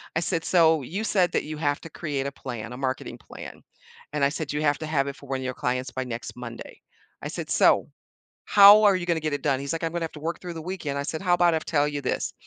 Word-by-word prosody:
I -, -, +3 dB
said, 165 Hz, -1 st, -1 dB
"So, 160 Hz, -4 st, +4 dB
you 195 Hz, -, -4 dB
said 190 Hz, -5 st, +2 dB
that -, -, 0 dB
you 155 Hz, 0 st, -6 dB
have 145 Hz, -2 st, -1 dB
to 165 Hz, -, -9 dB
create 145 Hz, -4 st, -3 dB
a 140 Hz, -, -4 dB
plan, 120 Hz, -3 st, -7 dB
a -, -, -7 dB
marketing 130 Hz, 0 st, -3 dB
plan," -, -, -11 dB, 0.5 s
and 150 Hz, -2 st, 0 dB
I 140 Hz, -, +5 dB
said, 150 Hz, -1 st, -4 dB
"You 150 Hz, -, -1 dB
have 145 Hz, -1 st, +2 dB
to 155 Hz, -, -4 dB
have 145 Hz, -3 st, 0 dB
it 140 Hz, -, -4 dB
for 140 Hz, -, -15 dB
one 135 Hz, -1 st, -1 dB
of 130 Hz, -, -6 dB
your 130 Hz, -, -2 dB
clients 125 Hz, +1 st, -2 dB
by 130 Hz, +1 st, -3 dB
next 120 Hz, -2 st, -6 dB
Monday." 120 Hz, -1 st, -9 dB, 0.4 s
I -, -, -4 dB
said, -, -, -6 dB
"So, -, -, +4 dB, 0.6 s
how 205 Hz, +1 st, +8 dB
are 205 Hz, -2 st, +6 dB
you 180 Hz, -1 st, -2 dB
gonna 170 Hz, -2 st, +1 dB
get 155 Hz, -1 st, -2 dB
it 145 Hz, -, -2 dB
done?" 135 Hz, -2 st, +1 dB
He's 140 Hz, +3 st, -3 dB
like, 165 Hz, -, -4 dB
"I'm 165 Hz, -, -1 dB
gonna 170 Hz, 0 st, -2 dB
have 160 Hz, -, -7 dB
to 150 Hz, -, -9 dB
work 165 Hz, +3 st, -3 dB
through 180 Hz, -1 st, -7 dB
the 165 Hz, -, -7 dB
weekend." 160 Hz, -5 st, -4 dB
I -, -, -2 dB
said, 155 Hz, +2 st, -4 dB
"How 180 Hz, -2 st, +2 dB
about 175 Hz, -1 st, +4 dB
I -, -, +1 dB
tell 145 Hz, -2 st, +1 dB
you 145 Hz, -1 st, -3 dB
this? 130 Hz, -, -2 dB
150 Hz, 285 wpm, -25 LUFS, 135-170 Hz, 0.6 s, how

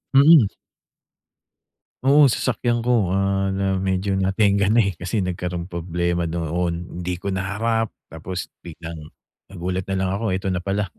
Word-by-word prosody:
Mm. 140 Hz, -4 st, +8 dB, 1.6 s
Oo, 145 Hz, +2 st, +6 dB
sasakyan 120 Hz, -1 st, 0 dB
ko, 110 Hz, -7 st, +2 dB
ah, 95 Hz, 0 st, +1 dB
na 95 Hz, -1 st, 0 dB
medyo 95 Hz, +1 st, -1 dB
natengga 100 Hz, +1 st, +2 dB
na, 115 Hz, +2 st, +4 dB
eh, 100 Hz, -, 0 dB
kasi 95 Hz, +3 st, -1 dB
nagkaroon 90 Hz, 0 st, -4 dB
problema 85 Hz, 0 st, -1 dB
noon, 85 Hz, +1 st, -3 dB
hindi 90 Hz, 0 st, -2 dB
ko 95 Hz, +3 st, -4 dB
naharap 105 Hz, +4 st, -1 dB, 0.2 s
tapos 90 Hz, +3 st, -6 dB
biglang, 85 Hz, -2 st, -9 dB, 0.4 s
nagulat 90 Hz, 0 st, -4 dB
na 95 Hz, -, -1 dB
lang 95 Hz, 0 st, 0 dB
ako 100 Hz, -1 st, -1 dB
eto 95 Hz, 0 st, -2 dB
na 90 Hz, -, -1 dB
pala. 100 Hz, 0 st, -2 dB
95 Hz, 140 wpm, -22 LUFS, 90-100 Hz, 1.6 s, Mm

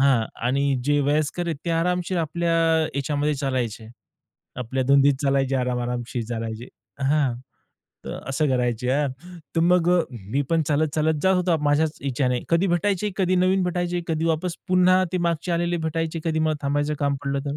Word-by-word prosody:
हां. 130 Hz, -5 st, +3 dB, 0.2 s
आणि 140 Hz, +2 st, +1 dB
जे 145 Hz, +1 st, +2 dB
वयस्कर 150 Hz, +4 st, 0 dB
आहेत 165 Hz, -, -2 dB
ते 170 Hz, -, -1 dB
आरामशीर 180 Hz, +2 st, 0 dB
आपल्या 170 Hz, +1 st, -1 dB, 0.4 s
याच्यामध्ये 145 Hz, +2 st, 0 dB
चालायचे. 130 Hz, -5 st, -2 dB, 0.7 s
आपल्या 125 Hz, +2 st, -2 dB
धुंदीत 140 Hz, 0 st, +5 dB
चालायचे 135 Hz, -1 st, +1 dB
आराम 125 Hz, -1 st, -1 dB
आरामशीर 120 Hz, 0 st, -3 dB
चालायचे. 115 Hz, 0 st, -5 dB, 0.3 s
हां. 140 Hz, -2 st, +2 dB, 0.7 s
तर -, -, -5 dB
असं 135 Hz, +3 st, +1 dB
करायची 125 Hz, -2 st, 0 dB
यार, 140 Hz, +3 st, +1 dB, 0.5 s
तर 165 Hz, -, +4 dB
मग 175 Hz, 0 st, +3 dB, 0.4 s
मी 140 Hz, +5 st, +1 dB
पण 165 Hz, -1 st, +3 dB
चालत-चालत 155 Hz, +1 st, +1 dB
जात 190 Hz, 0 st, +4 dB
होता 180 Hz, -2 st, +2 dB
माझ्याच 150 Hz, +2 st, +1 dB
ह्याच्याने. 125 Hz, -2 st, 0 dB
कधी 170 Hz, +3 st, +2 dB
भेटायचे 195 Hz, +3 st, 0 dB
कधी 185 Hz, -2 st, +1 dB
नवीन 185 Hz, +1 st, +3 dB
भेटायचे, 175 Hz, 0 st, -1 dB
कधी 160 Hz, 0 st, 0 dB
वापस 165 Hz, +2 st, -1 dB
पुन्हा 185 Hz, 0 st, +4 dB
ते 185 Hz, -, 0 dB
मागचे 170 Hz, 0 st, -1 dB
आलेले 175 Hz, +1 st, 0 dB
भेटायचे, 165 Hz, +1 st, -3 dB
कधी 160 Hz, -1 st, 0 dB
मला 155 Hz, 0 st, +1 dB
थांबायचं 145 Hz, +2 st, 0 dB
काम 140 Hz, -1 st, 0 dB
पडलं 140 Hz, 0 st, -1 dB
तर 140 Hz, +1 st, -2 dB
150 Hz, 165 wpm, -24 LUFS, 135-170 Hz, 0.7 s, धुंदीत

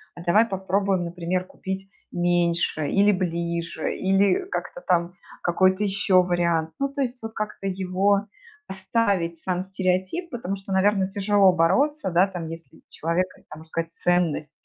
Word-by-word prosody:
а 175 Hz, -, -9 dB
давай 205 Hz, +6 st, +4 dB
попробуем, 190 Hz, -2 st, 0 dB
например, 175 Hz, +1 st, -2 dB
купить 190 Hz, +1 st, -6 dB, 0.2 s
меньше 170 Hz, -3 st, +1 dB
или 200 Hz, +1 st, +4 dB
ближе, 170 Hz, -2 st, -2 dB
или 195 Hz, -, +2 dB
как-то -, -, -4 dB
там 170 Hz, -, +1 dB, 0.3 s
какой-то 185 Hz, +3 st, +2 dB
еще 195 Hz, -2 st, +3 dB
вариант. 170 Hz, -2 st, 0 dB
Ну 275 Hz, -, 0 dB
то 280 Hz, 0 st, -3 dB
есть 250 Hz, -1 st, -2 dB
вот 225 Hz, -, -5 dB
как-то 215 Hz, -2 st, -4 dB
его 195 Hz, +2 st, +1 dB, 0.4 s
оставить, 190 Hz, -3 st, -1 dB
сам 180 Hz, +1 st, -2 dB
стереотип, 190 Hz, -, -1 dB
потому 215 Hz, -, -4 dB
что, 195 Hz, 0 st, -6 dB
наверно, 190 Hz, 0 st, +3 dB
тяжело 200 Hz, -1 st, +3 dB
бороться, 275 Hz, -, +2 dB
да, 175 Hz, +3 st, +4 dB
там, 180 Hz, -4 st, -6 dB
если 165 Hz, 0 st, -9 dB
у -, -, -22 dB
человека 170 Hz, +3 st, -2 dB
там, 155 Hz, -, -9 dB
можно -, -, -11 dB
сказать, 165 Hz, +1 st, -4 dB
ценность. 175 Hz, -4 st, 0 dB
185 Hz, 150 wpm, -24 LUFS, 170-200 Hz, 0.4 s, давай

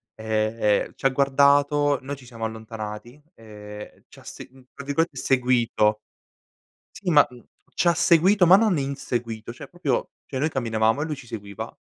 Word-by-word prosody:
e 110 Hz, -1 st, 0 dB
ci -, -, -11 dB
ha -, -, +6 dB
guardato, 140 Hz, +1 st, +3 dB
noi 140 Hz, +2 st, -5 dB
ci 130 Hz, -, -16 dB
siamo 115 Hz, -2 st, -9 dB
allontanati 110 Hz, +3 st, -8 dB
e 105 Hz, -1 st, -11 dB
c'ha -, -, -16 dB
se -, -, -10 dB, 0.2 s
tra 140 Hz, -, -9 dB
virgolette 155 Hz, +5 st, -1 dB
"seguito". 120 Hz, -4 st, +2 dB, 1.0 s
Sì, 190 Hz, -, -4 dB
ma, 150 Hz, -2 st, +6 dB
mhmm, 125 Hz, -1 st, -15 dB, 0.3 s
c'ha 170 Hz, -1 st, +3 dB
seguito, 180 Hz, +3 st, +4 dB
ma 185 Hz, -, +9 dB
non 215 Hz, -5 st, +2 dB
inseguito 120 Hz, -5 st, -4 dB
cioè 140 Hz, +3 st, -11 dB
proprio 175 Hz, +4 st, -2 dB, 0.2 s
cioè 130 Hz, -, -5 dB
noi 155 Hz, +4 st, +1 dB
camminavamo, 115 Hz, -1 st, 0 dB
e 155 Hz, -, -1 dB
lui 155 Hz, -, -4 dB
ci 125 Hz, -, -13 dB
seguiva, 100 Hz, -4 st, -8 dB
130 Hz, 155 wpm, -24 LUFS, 110-145 Hz, 1.0 s, ma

